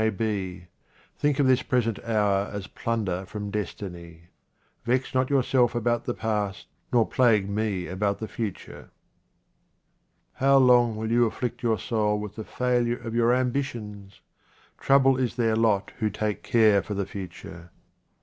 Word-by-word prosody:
may 110 Hz, -, +3 dB
be. 95 Hz, -5 st, -3 dB, 0.5 s
Think 145 Hz, -2 st, 0 dB
of 145 Hz, -, +3 dB
this 130 Hz, -1 st, +4 dB
present 115 Hz, -4 st, -1 dB
hour 105 Hz, -3 st, +1 dB
as 100 Hz, -2 st, -5 dB
plunder 100 Hz, -4 st, -3 dB
from 105 Hz, 0 st, -6 dB
destiny. 85 Hz, -5 st, -6 dB, 0.5 s
Vex 125 Hz, +2 st, 0 dB
not 130 Hz, 0 st, +1 dB
yourself 130 Hz, -3 st, +2 dB
about 120 Hz, 0 st, 0 dB
the 120 Hz, -, -2 dB
past, 105 Hz, -3 st, -2 dB, 0.3 s
nor 120 Hz, -3 st, +4 dB
plague 115 Hz, -6 st, +3 dB
me 100 Hz, -3 st, -2 dB
about 100 Hz, +2 st, -1 dB
the 110 Hz, -, -5 dB
future. 105 Hz, -5 st, -6 dB, 1.4 s
How 135 Hz, +1 st, +4 dB
long 125 Hz, -3 st, +5 dB
will 110 Hz, +1 st, -3 dB
you 120 Hz, 0 st, +4 dB
afflict 120 Hz, +2 st, -4 dB
your 115 Hz, -2 st, +1 dB
soul 105 Hz, -2 st, 0 dB
with 105 Hz, -1 st, -7 dB
the 110 Hz, -, -6 dB
failure 120 Hz, 0 st, 0 dB
of 115 Hz, -1 st, -7 dB
your 120 Hz, 0 st, +3 dB
ambitions? 120 Hz, -6 st, -3 dB, 0.6 s
Trouble 135 Hz, -1 st, +4 dB
is 125 Hz, -2 st, -1 dB
their 115 Hz, -3 st, +1 dB
lot 110 Hz, -3 st, +1 dB
who 110 Hz, -2 st, +1 dB
take 105 Hz, 0 st, -3 dB
care 110 Hz, -4 st, +4 dB
for 105 Hz, -, -5 dB
the 100 Hz, 0 st, -1 dB
future. 90 Hz, -3 st, -9 dB
110 Hz, 150 wpm, -26 LUFS, 100-120 Hz, 1.4 s, long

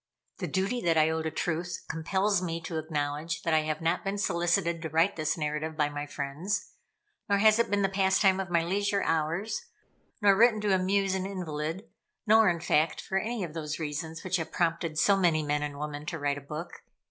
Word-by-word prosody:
The -, -, -2 dB
duty 195 Hz, +6 st, -1 dB
that 165 Hz, -2 st, +2 dB
I 155 Hz, 0 st, +4 dB
owe 160 Hz, 0 st, -1 dB
to 160 Hz, -, -2 dB
truth 170 Hz, +2 st, -3 dB
compels 190 Hz, +4 st, 0 dB
me 165 Hz, -2 st, -2 dB
to 165 Hz, -1 st, -3 dB
acknowledge 155 Hz, +1 st, -3 dB
that 165 Hz, -, +1 dB
I 160 Hz, -, +5 dB
have 155 Hz, 0 st, -2 dB
not 165 Hz, +2 st, 0 dB
been 195 Hz, +1 st, -2 dB
solicited 170 Hz, -2 st, +1 dB
to 160 Hz, -, -4 dB
write 165 Hz, +5 st, +2 dB
this 155 Hz, 0 st, -1 dB
narrative 155 Hz, +1 st, -3 dB
by 150 Hz, -1 st, +2 dB
my 145 Hz, 0 st, -5 dB
friends; 150 Hz, +9 st, -3 dB, 0.6 s
nor 200 Hz, -, +4 dB
has 215 Hz, +2 st, +5 dB
it 235 Hz, -, +2 dB
been 205 Hz, -1 st, +1 dB
the -, -, +4 dB
pastime 190 Hz, 0 st, +3 dB
of 190 Hz, -1 st, -3 dB
my 170 Hz, -1 st, +2 dB
leisure 200 Hz, +3 st, 0 dB
hours; 165 Hz, -, -1 dB, 0.6 s
nor 200 Hz, -3 st, +5 dB
written 225 Hz, +1 st, +5 dB
to 205 Hz, -2 st, +2 dB
amuse 190 Hz, +1 st, +2 dB
an 190 Hz, 0 st, -1 dB
invalid; 170 Hz, -1 st, -4 dB, 0.4 s
nor, 220 Hz, -1 st, +6 dB
in 170 Hz, -1 st, 0 dB
fact, 155 Hz, -2 st, +2 dB
for 190 Hz, -, -1 dB
any 225 Hz, +1 st, -3 dB
of 165 Hz, -4 st, -6 dB
those 155 Hz, -1 st, -4 dB
reasons 160 Hz, +1 st, -5 dB
which 185 Hz, 0 st, 0 dB
have 160 Hz, -, -5 dB
prompted 165 Hz, -2 st, -1 dB
so 200 Hz, +5 st, +5 dB
many 170 Hz, -5 st, +2 dB
men 150 Hz, 0 st, 0 dB
and 145 Hz, -1 st, -4 dB
women 150 Hz, 0 st, -5 dB
to 165 Hz, -, -3 dB
write 145 Hz, -1 st, -1 dB
a -, -, -16 dB
book. 150 Hz, +5 st, -7 dB
170 Hz, 210 wpm, -29 LUFS, 155-195 Hz, 0.6 s, nor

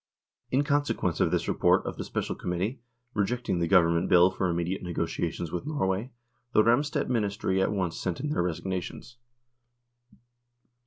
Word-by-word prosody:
In 135 Hz, +3 st, +2 dB
consequence 145 Hz, -, 0 dB
of -, -, +3 dB
this -, -, 0 dB
report -, -, +3 dB
of -, -, -4 dB
the -, -, -3 dB
Special -, -, -3 dB
Com -, -, -6 dB
mittee, 95 Hz, +9 st, -2 dB, 0.3 s
rejecting 105 Hz, -2 st, -1 dB
the 85 Hz, -, +1 dB
Government 85 Hz, -1 st, +4 dB
Bill 90 Hz, 0 st, +6 dB
for 95 Hz, -1 st, -1 dB
immediate 85 Hz, +2 st, -1 dB
negotiations 85 Hz, -1 st, -3 dB
with 90 Hz, +11 st, -4 dB
Norway, 115 Hz, -5 st, -1 dB, 0.4 s
the 110 Hz, -, +6 dB
Ramstedt 145 Hz, +6 st, +2 dB
Ministry 100 Hz, -5 st, 0 dB
at 95 Hz, -, +1 dB
once 95 Hz, -5 st, -1 dB
sent 90 Hz, -3 st, -3 dB
in 150 Hz, -, -2 dB
their 150 Hz, -, 0 dB
resignations. 95 Hz, +6 st, -4 dB
95 Hz, 155 wpm, -28 LUFS, 90-120 Hz, 0.4 s, Bill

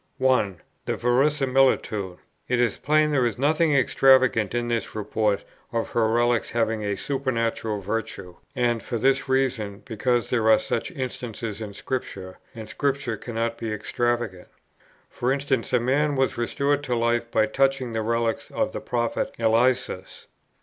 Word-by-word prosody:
1. 125 Hz, -9 st, +2 dB, 0.3 s
The -, -, 0 dB
verisimilitude. 130 Hz, -7 st, +2 dB, 0.3 s
It 125 Hz, -1 st, +1 dB
is 120 Hz, -3 st, +1 dB
plain 155 Hz, 0 st, +2 dB
there 135 Hz, -3 st, +2 dB
is 120 Hz, -1 st, 0 dB
nothing 155 Hz, +3 st, +2 dB
extravagant 130 Hz, -5 st, +4 dB
in 120 Hz, 0 st, -1 dB
this 115 Hz, -3 st, -2 dB
report 105 Hz, -1 st, 0 dB, 0.3 s
of 115 Hz, -1 st, -2 dB
her 115 Hz, -2 st, +2 dB
relics 120 Hz, +1 st, +1 dB
having 110 Hz, -2 st, 0 dB
a 100 Hz, -1 st, -1 dB
supernatural 115 Hz, -5 st, -1 dB
virtue; 100 Hz, -3 st, -4 dB, 0.2 s
and 120 Hz, -3 st, +1 dB
for 120 Hz, -, -3 dB
this 135 Hz, +3 st, +1 dB
reason, 120 Hz, -6 st, 0 dB
because 120 Hz, +1 st, 0 dB
there 115 Hz, -3 st, +2 dB
are 110 Hz, -, +7 dB
such 115 Hz, -, -2 dB
instances 120 Hz, -, -5 dB
in 105 Hz, -2 st, -6 dB
Scripture, 95 Hz, -8 st, -5 dB, 0.2 s
and 110 Hz, -2 st, -8 dB
Scripture 140 Hz, -1 st, -1 dB
cannot 115 Hz, +1 st, -3 dB
be 115 Hz, -2 st, -3 dB
extravagant. 115 Hz, -3 st, -2 dB, 0.6 s
For 125 Hz, +1 st, -2 dB
instance, 135 Hz, -3 st, -1 dB
a 125 Hz, -, +4 dB
man 140 Hz, +5 st, +1 dB
was 135 Hz, 0 st, +1 dB
restored 140 Hz, +4 st, 0 dB
to 125 Hz, -3 st, 0 dB
life 120 Hz, 0 st, 0 dB
by 110 Hz, -, +3 dB
touching 135 Hz, +1 st, 0 dB
the 110 Hz, -, -1 dB
relics 115 Hz, 0 st, -1 dB
of -, -, -1 dB
the -, -, -5 dB
Prophet 120 Hz, -1 st, -2 dB
Eliseus. 120 Hz, -1 st, 0 dB
120 Hz, 150 wpm, -25 LUFS, 110-130 Hz, 0.6 s, are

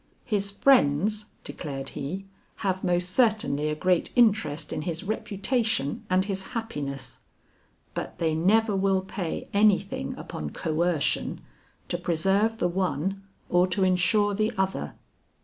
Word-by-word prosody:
"His 200 Hz, -4 st, 0 dB
friends," 210 Hz, -, +3 dB, 0.2 s
declared 135 Hz, -4 st, -5 dB
he, 180 Hz, +8 st, -5 dB, 0.4 s
"have 190 Hz, -1 st, 0 dB
most 180 Hz, -1 st, +1 dB
certainly 210 Hz, -, +2 dB
a 150 Hz, -, -1 dB
great 180 Hz, +2 st, +1 dB
interest 210 Hz, -, +2 dB
in -, -, -2 dB
his 165 Hz, +2 st, -4 dB
reputation 215 Hz, -, -1 dB
and 185 Hz, +1 st, +3 dB
his 195 Hz, -2 st, -2 dB, 0.2 s
happiness; 140 Hz, -, -4 dB, 0.7 s
but -, -, -5 dB
they 160 Hz, -2 st, +1 dB
never 205 Hz, +6 st, +3 dB
will 195 Hz, 0 st, +2 dB
pay 190 Hz, -3 st, -4 dB
any 205 Hz, -1 st, +6 dB
thing 185 Hz, -, -5 dB
upon 75 Hz, -1 st, -6 dB
coercion 160 Hz, -, 0 dB, 0.5 s
to -, -, -2 dB
preserve 195 Hz, +7 st, +1 dB
the 175 Hz, -, +1 dB
one 190 Hz, +1 st, -1 dB, 0.3 s
or 180 Hz, +1 st, +3 dB
to 190 Hz, +1 st, 0 dB
insure 190 Hz, +3 st, +3 dB
the 215 Hz, +2 st, +1 dB
other." 190 Hz, -, -1 dB
190 Hz, 130 wpm, -27 LUFS, 160-210 Hz, 0.7 s, any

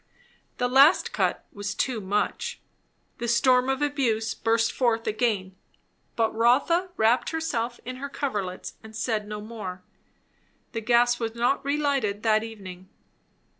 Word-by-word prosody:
That 245 Hz, 0 st, 0 dB
last 305 Hz, -, +5 dB
cut -, -, 0 dB
was 205 Hz, 0 st, -4 dB
too 245 Hz, -5 st, -1 dB
much. 205 Hz, +2 st, -2 dB, 0.6 s
The 240 Hz, -, -3 dB
storm 250 Hz, +2 st, +4 dB
of 270 Hz, +2 st, 0 dB
abuse 235 Hz, -7 st, 0 dB
burst 225 Hz, 0 st, +1 dB
forth 230 Hz, -3 st, +1 dB
again; 210 Hz, -4 st, -1 dB, 0.6 s
but 225 Hz, -1 st, +1 dB
Rotha 275 Hz, +11 st, +3 dB
wrapped 225 Hz, +3 st, +3 dB
herself 245 Hz, -8 st, -2 dB
in 255 Hz, +1 st, -5 dB
her 280 Hz, +2 st, -5 dB
coverlets 205 Hz, -11 st, -4 dB
and 220 Hz, 0 st, -12 dB
said 220 Hz, -2 st, -1 dB
no 210 Hz, 0 st, -5 dB
more. 210 Hz, -5 st, -7 dB, 0.9 s
The 225 Hz, -, -4 dB
gas 240 Hz, +1 st, +3 dB
was 225 Hz, -1 st, -3 dB
not 245 Hz, +4 st, +1 dB
relighted 280 Hz, -8 st, 0 dB
that 215 Hz, -1 st, +3 dB
evening. 190 Hz, -5 st, -9 dB
230 Hz, 135 wpm, -26 LUFS, 215-260 Hz, 0.9 s, last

